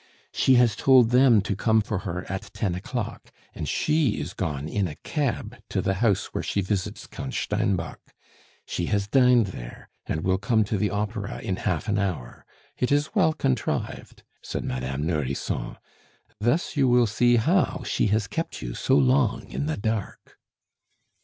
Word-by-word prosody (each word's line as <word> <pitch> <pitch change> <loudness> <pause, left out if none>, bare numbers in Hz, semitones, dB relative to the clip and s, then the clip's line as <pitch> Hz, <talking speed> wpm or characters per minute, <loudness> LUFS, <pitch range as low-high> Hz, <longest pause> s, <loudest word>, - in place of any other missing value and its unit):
"She 130 - +4
has 120 -4 +4
told 125 0 +5
them 125 -4 +6
to 100 0 -2
come 110 +3 +3
for 105 -2 -2
her 90 0 -4
at 95 0 -5
ten 100 -6 -1
o'clock, 115 +5 -5 0.2
and - - -4
she 150 -7 +1
is 90 - -5
gone 75 -5 -3
in 100 +2 0
a 75 - -7
cab 140 - -3
to - - -1
the 95 - +1
house 110 -5 +1
where - - -1
she 100 - -1
visits 100 +2 -3
Count 135 -1 -7
Steinbock. 100 -5 -1 0.7
She 85 - -3
has 100 -2 +1
dined 125 -3 +4
there, - - -9 0.2
and 80 - -2
will 95 0 +1
come 110 +2 +2
to 105 +1 -2
the 105 +1 +1
Opera 105 0 -3
in 95 - -2
half 90 -3 -2
an 105 0 +1
hour. 90 -12 -4 0.3
It 125 - 0
is 145 +5 +1
well 180 -7 +3
contrived!" 65 - -2 0.2
said - - -4
Madame 65 +3 -3
Nourrisson. 75 -5 -2 0.6
"Thus 120 +13 0
you 125 -4 +4
see 120 +3 +3
how 165 - +2
she 105 0 +1
has 105 +1 +1
kept 165 +12 -4
you - - -4
so - - +2
long 65 0 +2
in 70 +4 -2
the 80 - -1
dark." 110 -1 -4
105 Hz, 170 wpm, -25 LUFS, 90-120 Hz, 0.7 s, them